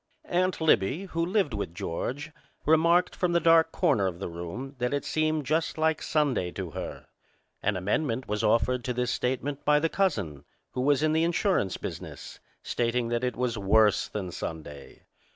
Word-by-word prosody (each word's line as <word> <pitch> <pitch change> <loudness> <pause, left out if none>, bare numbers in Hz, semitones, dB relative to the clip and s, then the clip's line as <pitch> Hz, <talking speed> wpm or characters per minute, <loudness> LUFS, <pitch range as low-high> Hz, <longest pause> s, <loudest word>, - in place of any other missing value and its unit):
Aunt 185 +1 0
Libbie, 155 - +2
who 165 -1 -1
lived 180 - +1
with 100 -5 -4
George, 135 - -4 0.3
remarked 170 +3 +4
from 180 -2 0
the 170 - +4
dark 165 -1 +5
corner 135 - +2
of 90 -2 -4
the 95 - -5
room 85 +11 -6
that 125 +3 0
it 140 - -3
seemed 155 -1 0
just 160 +4 0
like 160 0 +1
Sunday 140 - +1
to 95 -4 -5
her. - - -6 0.6
An 105 -1 0
amendment 115 - -1
was 105 +1 -2
offered 115 +3 +2
to 125 - -1
this 125 0 -1
statement 135 +3 -2
by 150 0 +4
the 165 +2 +1
cousin, 100 - -1 0.3
who 125 - -3
was 145 +1 +3
in 155 0 +3
the 160 +1 +3
insurance 170 - +1
business, - - -7 0.2
stating 120 0 0
that 120 +1 -1
it 125 - -1
was 120 -3 -1
worse 105 +1 +4
than 95 -4 -5
Sunday. 75 -4 -7
130 Hz, 175 wpm, -28 LUFS, 105-160 Hz, 0.6 s, dark